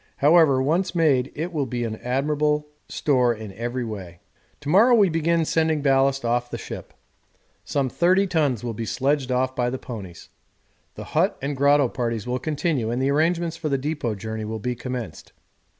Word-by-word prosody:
However, 145 Hz, -3 st, +5 dB
once 175 Hz, +6 st, 0 dB
made 140 Hz, -6 st, +2 dB
it 170 Hz, +4 st, -4 dB
will 145 Hz, -4 st, -1 dB
be 120 Hz, 0 st, -2 dB
admirable 150 Hz, +6 st, -1 dB, 0.4 s
in 120 Hz, -7 st, +2 dB
every 120 Hz, +4 st, -3 dB
way. 95 Hz, -6 st, -7 dB, 0.4 s
To 145 Hz, -, -9 dB
morrow 225 Hz, +9 st, +6 dB
we 205 Hz, -4 st, +5 dB
begin 165 Hz, 0 st, +1 dB
sending 160 Hz, -2 st, +1 dB
ballast 135 Hz, -1 st, +2 dB
off 120 Hz, +1 st, +1 dB
to 120 Hz, -, -26 dB
the -, -, -2 dB
ship; -, -, -9 dB, 0.7 s
some 140 Hz, -2 st, -1 dB
30 180 Hz, +9 st, +3 dB
tons 150 Hz, -, 0 dB
will 120 Hz, -1 st, -3 dB
be 115 Hz, -, -5 dB
sledged 135 Hz, +1 st, 0 dB
off 130 Hz, +1 st, 0 dB
by 125 Hz, -1 st, 0 dB
the 130 Hz, -, -3 dB
ponies. 100 Hz, -10 st, -9 dB, 0.7 s
The -, -, -7 dB
hut -, -, +2 dB
and 140 Hz, +1 st, -3 dB
grotto 140 Hz, 0 st, +4 dB
parties 115 Hz, -3 st, -3 dB
will 125 Hz, +1 st, -2 dB
continue, 150 Hz, -4 st, -1 dB
and 120 Hz, +2 st, -1 dB
the 135 Hz, +1 st, +1 dB
arrangements 165 Hz, +2 st, +1 dB
for 160 Hz, -2 st, -3 dB
the 140 Hz, -, +1 dB
depot 140 Hz, -5 st, -2 dB
journey 110 Hz, +2 st, -5 dB
will 110 Hz, +1 st, -4 dB
be 125 Hz, +4 st, -2 dB
commenced. 125 Hz, -1 st, -7 dB
135 Hz, 180 wpm, -23 LUFS, 120-155 Hz, 0.7 s, morrow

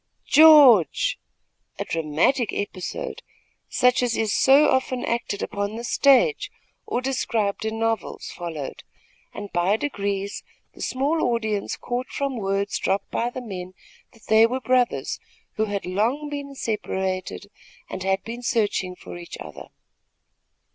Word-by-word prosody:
"George!" 290 Hz, -, +6 dB, 0.6 s
A -, -, -3 dB
dramatic 165 Hz, -, +1 dB
episode, 205 Hz, -, -5 dB, 0.5 s
such 250 Hz, 0 st, +3 dB
as 245 Hz, -2 st, 0 dB
is 220 Hz, -2 st, 0 dB
so 275 Hz, +3 st, +5 dB
often 260 Hz, -1 st, 0 dB
acted 230 Hz, -3 st, -2 dB
upon 200 Hz, +1 st, -3 dB
the 235 Hz, -, -6 dB
stage, 280 Hz, -, +3 dB, 0.4 s
or 245 Hz, -, -1 dB
described 225 Hz, -6 st, -1 dB
in 220 Hz, 0 st, -2 dB
novels, 225 Hz, -2 st, -2 dB
followed, 160 Hz, -6 st, -6 dB, 0.5 s
and, 205 Hz, -, -8 dB
by 175 Hz, +4 st, +2 dB
degrees, 200 Hz, -6 st, -3 dB, 0.3 s
the -, -, -13 dB
small 285 Hz, +5 st, 0 dB
audience 215 Hz, -3 st, -2 dB
caught 245 Hz, +1 st, -3 dB
from 275 Hz, -2 st, -3 dB
words 195 Hz, -1 st, -1 dB
dropped 195 Hz, +1 st, -1 dB
by 235 Hz, -, 0 dB
the 255 Hz, +1 st, -7 dB
men, 185 Hz, -5 st, -7 dB, 0.4 s
that 225 Hz, -, -20 dB
they 220 Hz, +1 st, +6 dB
were 255 Hz, +3 st, -2 dB
brothers, 255 Hz, -1 st, 0 dB, 0.4 s
who 220 Hz, -, +2 dB
had 205 Hz, -2 st, -3 dB
long 235 Hz, +11 st, -1 dB
been 285 Hz, -1 st, -6 dB
separated, 190 Hz, -6 st, -3 dB, 0.4 s
and -, -, -6 dB
had 190 Hz, +1 st, 0 dB
been 235 Hz, +2 st, -7 dB
searching 205 Hz, -6 st, 0 dB
for 175 Hz, -, -10 dB
each 170 Hz, -, -9 dB
other. 75 Hz, -2 st, -9 dB
225 Hz, 135 wpm, -24 LUFS, 195-255 Hz, 0.6 s, George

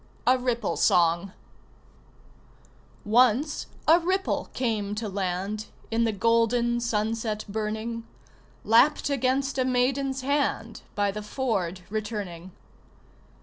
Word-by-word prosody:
A 255 Hz, -, +5 dB
RIPPLE 245 Hz, -2 st, -1 dB
SONG 170 Hz, +2 st, +3 dB, 1.7 s
Once 250 Hz, +6 st, +3 dB, 0.2 s
a 330 Hz, +2 st, +7 dB
ripple 375 Hz, +3 st, -1 dB
came 215 Hz, -5 st, -1 dB
to 220 Hz, +1 st, -3 dB
land 195 Hz, +2 st, -3 dB, 0.2 s
In 230 Hz, +1 st, +2 dB
the 225 Hz, -, +1 dB
golden 230 Hz, +3 st, +2 dB
sunset 220 Hz, -1 st, -1 dB
burning 220 Hz, +2 st, -4 dB, 0.6 s
Lapped 235 Hz, +6 st, +4 dB
against 270 Hz, +1 st, 0 dB
a -, -, +3 dB
maiden's 260 Hz, +2 st, 0 dB
hand, 265 Hz, -4 st, -1 dB
By 205 Hz, -1 st, +1 dB
the 210 Hz, +2 st, -5 dB
ford 205 Hz, -6 st, -2 dB
returning. 205 Hz, -5 st, -4 dB
230 Hz, 105 wpm, -26 LUFS, 210-255 Hz, 1.7 s, a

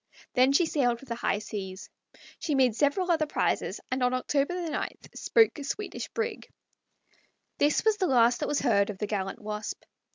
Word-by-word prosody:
Then 255 Hz, +2 st, +5 dB
she 310 Hz, +5 st, +4 dB
sailed 250 Hz, -7 st, +1 dB
for 275 Hz, -, -14 dB
the 240 Hz, -, -4 dB
high 230 Hz, -, 0 dB
seas. 200 Hz, -2 st, -6 dB, 0.5 s
She 300 Hz, -, -1 dB
made 255 Hz, -4 st, +3 dB
several 300 Hz, +7 st, +2 dB
other 315 Hz, -2 st, +2 dB
prizes, -, -, -1 dB
and 255 Hz, 0 st, -1 dB
on 250 Hz, 0 st, +2 dB
October 285 Hz, +7 st, 0 dB
9 315 Hz, -, -1 dB, 0.3 s
spoke 450 Hz, -8 st, +3 dB
a -, -, -5 dB
Swedish 410 Hz, +9 st, -4 dB
brig. 455 Hz, -2 st, -4 dB, 1.1 s
This 295 Hz, +7 st, +2 dB
was 440 Hz, -1 st, +4 dB
the 375 Hz, -, +1 dB
last 240 Hz, -2 st, +4 dB
that 295 Hz, -, -1 dB
was 295 Hz, -, +1 dB
ever 270 Hz, -, +1 dB
heard 200 Hz, 0 st, +3 dB
of 205 Hz, -, -5 dB
the 210 Hz, -, -2 dB
gallant 195 Hz, -2 st, -3 dB
Wasp. 210 Hz, 0 st, -5 dB
265 Hz, 190 wpm, -28 LUFS, 220-310 Hz, 1.1 s, Then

